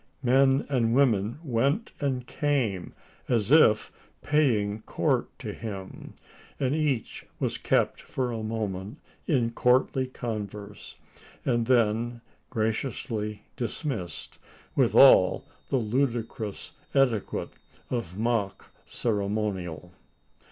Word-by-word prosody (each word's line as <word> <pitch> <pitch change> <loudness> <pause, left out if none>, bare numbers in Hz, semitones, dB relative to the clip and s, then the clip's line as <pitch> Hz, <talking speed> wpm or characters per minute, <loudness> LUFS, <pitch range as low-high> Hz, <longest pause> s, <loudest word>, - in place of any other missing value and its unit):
Men 135 +2 +4
and 120 -4 +1
women 115 -5 +2
went 140 - 0
and 130 -4 -1
came, 130 - -1 0.4
as 115 -1 +1
if 110 -9 +5 0.3
paying 110 -9 +2
court - - 0
to - - -6
him; 100 -4 -8 0.4
and 130 0 +1
each 150 -7 -1
was - - -1
kept - - +1
for 125 -2 -3
a 115 -1 -3
moment 110 0 -4 0.3
in 120 -7 +2
courtly 130 +2 +2
converse, 105 -4 -6 0.5
and 120 -3 +1
then 120 -1 +2 0.3
graciously 110 -2 -2
dismissed, 115 - -4 0.4
with - - +3
all - - +7 0.2
the 135 - +2
ludicrous 115 -3 -2 0.2
etiquette 125 -7 +1 0.4
of 110 -8 -3
mock 110 -3 -1 0.2
ceremonial! 100 -6 -2
115 Hz, 100 wpm, -27 LUFS, 105-130 Hz, 0.5 s, all